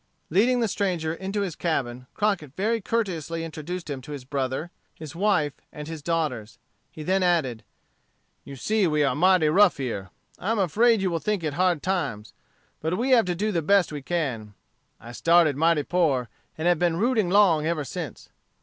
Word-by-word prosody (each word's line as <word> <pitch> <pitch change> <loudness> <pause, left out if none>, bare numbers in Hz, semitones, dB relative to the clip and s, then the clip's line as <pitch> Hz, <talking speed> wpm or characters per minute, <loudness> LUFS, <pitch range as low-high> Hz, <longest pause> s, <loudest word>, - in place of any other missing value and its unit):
Leading 240 +8 +3
the 230 - +2
stranger 180 -6 -1
into 195 +4 -3
his 185 -6 -3
cabin, 125 -7 -2
Crockett 195 -10 -1
very 225 +4 0
courteously 170 -7 -2
introduced 165 +2 -6
him 140 -3 -5
to 145 +3 -9
his 135 -3 -8
brother, 135 +4 -3 0.2
his 155 -2 -9
wife, 175 -7 +1 0.2
and 150 0 -8
his 160 -2 -7
daughters. 135 -9 -2 0.3
He 155 - -8
then 190 +4 +1
added: 160 -11 +1 0.8
"You 140 - -9
see 210 - +1
we 150 -2 +2
are 140 - +2
mighty 180 0 +4
rough 185 +1 +4
here. 115 -8 -4 0.3
I 195 - -3
am 225 - +1
afraid 210 +4 +3
you 185 - 0
will 165 - -1
think 210 0 -2
it 155 -2 -2
hard 175 -1 +1
times. 140 - -2 0.5
But 160 +3 -1
we 255 +4 0
have 235 -5 +5
to 180 -1 -1
do 210 +5 -1
the 170 -4 0
best 195 +1 +3
we 145 -1 -5
can. 130 -10 -3 0.4
I 120 - -11
started 165 +5 +3
mighty 160 0 +2
poor, 140 -9 +1 0.3
and 160 +2 -1
have 175 -3 +3
been 170 -2 +1
rooting 220 -2 +1
'long 175 -6 +4
ever 165 -3 -1
since. 155 - -7
165 Hz, 185 wpm, -25 LUFS, 145-190 Hz, 0.8 s, have